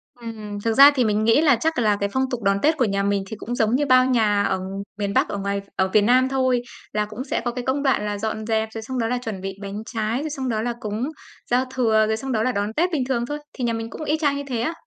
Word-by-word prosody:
Ừm, 230 -2 -8
ừm, 210 -1 -7
thực 225 - +2
ra 280 +4 +9
thì 255 - +3
mình 210 0 +1
nghĩ 230 +7 +4
là 290 -6 +5
chắc 315 +3 -1
là 210 -3 +3
cái 200 - 0
phong 260 0 0
tục 245 - -3
đón 195 0 +3
Tết 310 +1 +3
của 255 - +3
nhà 200 -1 0
mình 200 -1 0
thì 220 - -6
cũng 245 +3 -5
giống 220 +1 +2
như 290 +2 +1
bao 255 -1 +5
nhà 215 -5 +2
ở 190 -1 0 0.4
miền 200 -1 -1
bắc, - - +2
ở 205 - -3
ngoài 200 0 -2
ở 190 - +2
Việt 215 - +6
Nam 255 +4 +4
thôi, 260 -2 +1 0.3
là 210 0 +1
cũng 215 +5 -7
sẽ 265 - -2
có 240 - 0
cái 245 0 -5
công 275 +2 0
đoạn 265 -6 +2
là 205 0 -2
dọn 215 +1 -3
dẹp, 220 -1 0
rồi 225 - -5
xong 255 +3 -4
đó 225 - 0
là 250 - 0
chuẩn 215 -6 -5
bị 195 0 -5
bánh 200 +1 -5
trái, 225 +2 -2
rồi 310 - -3
xong 270 -3 -3
đó 220 -2 0
là 240 +1 -1
cúng 220 +5 -3 0.4
giao 250 +2 +3
thừa, 220 -4 +3
rồi 220 - 0
xong 265 +4 -5
đó 220 -2 +1
là 255 - +1
đón 205 -1 -2
Tết 350 +6 +1
bình 285 -5 0
thường 240 -2 0
thôi. 295 +3 -4
Thì 260 - -6
nhà 235 -1 +1
mình 225 0 -4
cũng 310 - -7
y 305 +1 0
chang 290 -3 +1
như 285 - -4
thế 240 -4 -2
á. 320 +8 -1
230 Hz, 305 wpm, -23 LUFS, 210-260 Hz, 0.4 s, ra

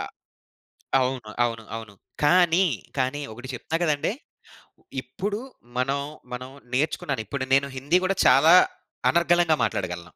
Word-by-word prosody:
ఆ! - - -2 1.0
అవును. 125 -4 -2
అవును. 115 -1 -2
అవును. 110 -3 -8 0.3
కానీ, 175 +3 +5 0.3
కానీ 130 +3 0
ఒకటి 125 +4 -10
చెప్తా 140 +6 -4
గదండీ! 150 +3 +1 0.9
ఇప్పుడు 200 - -4 0.4
మనం, 135 +2 +1 0.3
మనం 125 +1 -6 0.2
నేర్చుకున్నాను. 135 -3 -1
ఇప్పుడు 130 +5 -3
నేను 140 +1 +3
హిందీ 145 +7 +2
గూడా 195 0 0
చాలా 160 +6 +7 0.6
అనర్గళంగా 170 -2 +3
మాట్లాడగలను. 90 -2 -3
140 Hz, 120 wpm, -25 LUFS, 125-170 Hz, 1.0 s, చాలా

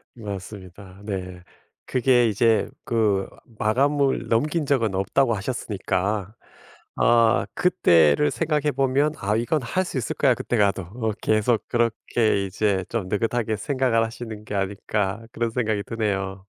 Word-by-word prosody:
맞습니다. 100 -2 -9
네. 90 -3 -6 0.4
그게 125 -2 +3
이제 110 +1 +2 0.2
그 105 -4 +1 0.3
마감을 135 +5 +1
넘긴 150 +7 +1
적은 115 -8 +1
없다고 115 +6 +1
하셨으니까 105 -1 -2 0.6
어 115 -1 +4
그때를 80 - +4
생각해 150 -2 0
보면 135 +3 +1
'아 105 +2 -1
이건 125 +6 0
할 185 +11 0
수 145 - -5
있을 130 - -3
거야 130 -4 +3
그때 120 - -2
가도.' 100 -2 +2
어 110 +5 -3
계속 110 +1 +1
그렇게 115 -3 +1
이제 95 -1 0
좀 110 -6 -3
느긋하게 110 +1 -1
생각을 125 -1 +1
하시는 110 -2 -8
게 - - -7
아닐까 100 +2 -2
그런 115 0 -1
생각이 110 -4 -1
드네요. 100 -4 -3
110 Hz, 285 characters per minute, -24 LUFS, 100-120 Hz, 0.6 s, 어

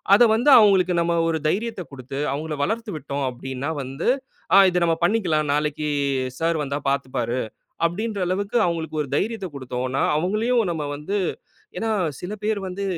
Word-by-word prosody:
அதை 240 - +7
வந்து 240 +6 +3
அவங்களுக்கு 195 -5 +5
நம்ம 170 0 +1
ஒரு 165 -1 +1
தைரியத்த 220 +4 -1
கொடுத்து, 135 0 -8
அவங்களை 155 +2 -3
வளர்த்து 225 +8 -1
விட்டோம் 140 -1 -4
அப்படின்னா 130 +3 -5
வந்து, 135 +1 -4 0.5
ஆ - - +9
இத 180 - -1
நம்ம 165 -1 +3
பண்ணிக்கலாம் 175 -7 +1
நாளைக்கு 150 +1 -1 0.5
சார் 165 0 +1
வந்தா 140 -1 -2
பார்த்துப்பாரு. 130 -3 -1 0.5
அப்படின்ற 205 +5 -3
அளவுக்கு 200 +5 -1
அவங்களுக்கு 160 -2 -3
ஒரு 145 - -8
தைரியத்தை 205 +1 -2
கொடுத்தோன்னா 130 0 -2
அவங்களையும், 215 +9 +1
நம்ம 160 -3 -2
வந்து 175 +8 -2 0.6
ஏன்னா, 225 - -1 0.3
சில 180 +3 -5
பேர் 215 -1 0
வந்து. 190 +2 -4
165 Hz, 155 wpm, -23 LUFS, 140-200 Hz, 0.6 s, ஆ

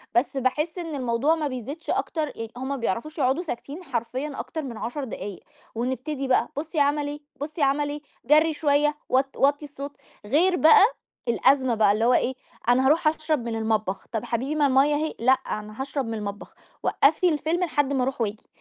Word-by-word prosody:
بس 265 +3 +2
باحِسّ 300 +7 0
إن 330 -4 -4
الموضوع 255 +4 +1
ما 310 -2 -1
بيزيدش 275 +5 -6
أكتر 315 -2 -1
يعني 225 -1 -6
هُم 260 +1 -4
ما 280 - -1
بيعرفوش 250 - -3
يقعدوا 275 +4 +1
ساكتين 295 +3 -6
حرفيًا 260 +1 -3
أكتر 315 - -4
من 250 -6 -6
10 240 +7 -4
دقايق، 205 -6 -6 0.4
ونبتدي 260 +4 -2
بقى 260 - +2
بُصي 310 +2 -2
عمل 290 0 +2
إيه، 290 0 -5 0.2
بُصي 305 +2 -4
عمل 285 +1 +2
إيه، 295 +1 -5 0.2
جري 310 +4 +5
شوية، 295 0 +2
وط 270 +1 +1
وَطّي 285 +2 +2
الصوت، 285 0 -8 0.3
غير 335 - +3
بقى 320 +4 +7 0.4
الأزمة 260 +1 +3
بقى، 210 -2 +4
اللي 220 +3 +1
هو 250 - +5
إيه، 255 - +2 0.4
"أنا 255 +2 +4
هاروح 310 +4 +4
أشرب 310 -4 0
من 230 -1 -2
المطبخ." 220 -3 -1
"طب 225 -3 -2
حبيبي، 260 +6 -2
ما 295 -2 +3
المَيّة 275 +2 +4
أهي." 310 +1 -2
"لأ، 255 +3 +5
أنا 215 -2 -4
هاشرب 275 -1 -2
من 225 - -3
المطبخ، 205 -2 -6 0.3
وقفي 365 - +3
الفيلم 320 +3 0
لحد 290 -4 0
ما 260 - +1
أروح 260 -1 -2
وآجي." 215 -1 -3
275 Hz, 190 wpm, -25 LUFS, 240-300 Hz, 0.4 s, بقى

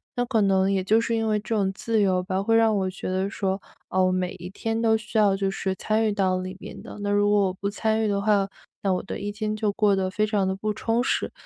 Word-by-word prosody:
那 245 - +1
可 235 -3 +1
能 195 -1 +3
也 190 -1 +1
就 215 +4 +4
是 230 0 0
因 225 0 0
为 215 -1 +1
这 225 +2 -3
种 195 -2 +1
自 225 +3 -1
由 185 -2 +2
吧， 185 +1 -1
会 225 +2 +2
让 225 -1 +4
我 190 -2 0
觉 190 - -7
得 190 +1 0
说， 195 -1 -2 0.3
哦， 185 0 +2
每 185 0 -1
一 180 +1 -8
天 225 +3 -3
都 225 -1 +3
需 220 +1 -5
要 205 -2 +4
就 195 0 0
是 195 0 -2
参 220 +3 0
与 215 - +2
到 190 -2 +1
里 185 0 -5
边 190 - -10
的。 - - -9
那 205 - -2
如 205 0 +3
果 205 -1 +3
我 185 - -2
不 200 +2 -3
参 220 +1 0
与 - - +1
的 200 -1 0
话， 200 -2 +2 0.3
那 195 - +1
我 180 - -1
的 - - -6
一 205 +1 -3
天 215 0 -3
就 215 -1 0
过 205 -1 +3
得 190 -1 0
非 210 +3 0
常 205 -3 +1
地 190 - -1
不 210 +2 -2
充 225 +3 0
实。 - - 0
205 Hz, 300 characters per minute, -25 LUFS, 190-220 Hz, 0.3 s, 就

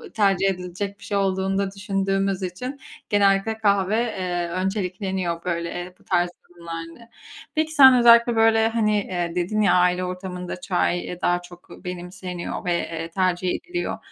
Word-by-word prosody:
tercih 195 -3 +3
edilecek 190 +2 -4
bir - - -15
şey 205 - -2
olduğunu 195 0 0
da 195 -1 -1
düşündüğümüz 195 -1 -1
için 250 +10 -5 0.3
genellikle 200 +1 +2
kahve, 200 -2 +2
eee, 180 -6 -2
öncelikleniyor, 185 -1 -2
böyle, 170 -1 -2
eee, 180 +1 -6
bu - - -23
tarz 175 -1 +1 0.2
durumlarda. 170 +5 -9 0.5
Peki 315 0 0
sen 265 -4 +8
özellikle, 235 0 +6
böyle, 225 0 +4
hani, 215 -3 0 0.3
dedin 180 +5 0
ya, 200 -4 +4
aile 180 0 +3
ortamında 180 -1 -5
çay 180 -1 -1
daha 175 0 +1
çok 175 0 -15
benimseniyor 180 0 -6
ve, 175 - +1
eee, 165 -1 -4
tercih 185 0 0
ediliyor 355 0 -4
190 Hz, 145 wpm, -23 LUFS, 180-205 Hz, 0.5 s, sen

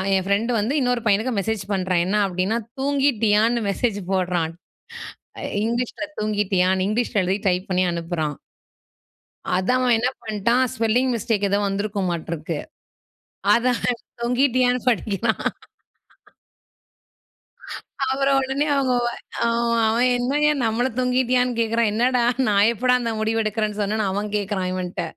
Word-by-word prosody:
என் 190 -1 0
friend 205 +5 +1
வந்து 220 +6 -1
இன்னொரு 245 -1 +1
பையனுக்கு 215 +5 +2
மெசேஜ் 220 0 -2
பண்றான் 185 -2 +1
என்ன 190 +3 -1
அப்படின்னா, 185 +4 -1 0.2
தூங்கிட்டியான்னு 235 -5 +2
மெசேஜ் 205 +1 -1
போடுறான். 175 -3 0 0.9
அ - - -6 0.2
இங்கிலீஷில 240 +6 -2
தூங்கிட்டியான்னு 190 -3 +1
இங்கிலீஷில 215 -1 0
எழுதி 190 +3 -1
டைப் 180 +1 -1
பண்ணி 185 0 +2
அனுப்புறான். 165 -3 -3 1.2
அதான். 195 +8 +1
அவன் 245 -2 +4
என்ன 245 +3 +1
பண்டான், 235 +4 +1
ஸ்பெல்லிங் 240 +3 +1
மிஸ்டேக் 215 -2 0
ஏதோ 200 - +2
வந்திருக்குமாட்டிருக்கு. 175 -6 -3 1.0
அத 245 +1 +2 0.5
தொங்கிட்டியான்னு 250 0 +1
படிக்கிறான். 220 -1 0 2.7
அப்புறம் 275 0 +2
உடனே 270 +3 -1
அவுங்க 265 -2 +1 0.5
ஆ. - - +3 0.4
அவன், 235 +3 +2
என்னயா! 290 +5 +2
நம்மள 230 +2 +1
தொங்கிட்டியான்னு 250 0 +2
கேக்கிறான். 230 0 +1
என்னடா! 245 +3 +2 0.2
நான் 205 0 +4
எப்படா 250 +2 +2
இந்த 230 -1 -1
முடிவு 220 +1 0
எடுக்குறேன் 215 -1 -2
சொன்னேன்னு, 210 +1 0
அவன் 205 +2 -2
கேக்கிறான், 200 -2 -2
இவன்ட்ட. 185 -1 -3
220 Hz, 120 wpm, -22 LUFS, 195-245 Hz, 2.7 s, அவன்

